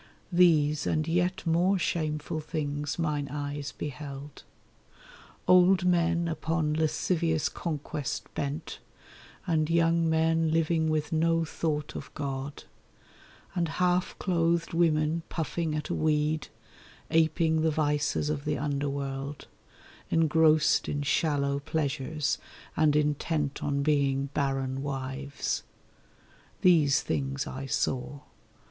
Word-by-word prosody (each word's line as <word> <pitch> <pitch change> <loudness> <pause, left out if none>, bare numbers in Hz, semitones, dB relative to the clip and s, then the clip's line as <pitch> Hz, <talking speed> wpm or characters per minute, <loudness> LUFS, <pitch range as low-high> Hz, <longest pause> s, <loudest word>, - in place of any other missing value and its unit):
These 155 -4 +4
and 155 0 0
yet 175 +2 0
more 175 +4 +3
shameful 155 -3 -2
things 145 -2 -3
mine 150 -4 -1
eyes 145 0 -4
beheld: 145 0 -7 1.1
Old 180 0 +6
men 170 -1 +2
upon 160 -1 -1
lascivious 160 +1 +1
conquest 150 -3 -4
bent, 145 +3 -4 0.7
and 160 -4 +1
young 165 0 +3
men 160 0 +2
living 160 0 +1
with 155 -1 -1
no 165 +1 +2
thought 150 -2 -3
of - - -7
God, 140 -1 -4 0.9
And 175 -2 0
half 180 0 +1
clothed 170 -2 0
women 160 -1 +2
puffing 160 -1 -2
at 150 -1 -4
a - - 0
weed, 155 0 +1 0.6
aping 160 0 +3
the 160 - +3
vices 150 -1 0
of 145 -2 -3
the 150 -1 -1
underworld, 140 0 -3 0.6
Engrossed 160 -1 +3
in 145 0 -2
shallow 140 -1 +1
pleasures 150 0 -1 0.4
and 150 -1 +3
intent 150 -1 0
on 140 -1 0
being 140 -2 +1
barren 135 -1 -1
wives. 140 0 -3 1.0
These 155 -6 +4
things 135 0 -2
I 135 +1 -6
saw. 130 +1 -2
155 Hz, 110 wpm, -28 LUFS, 145-165 Hz, 1.1 s, Old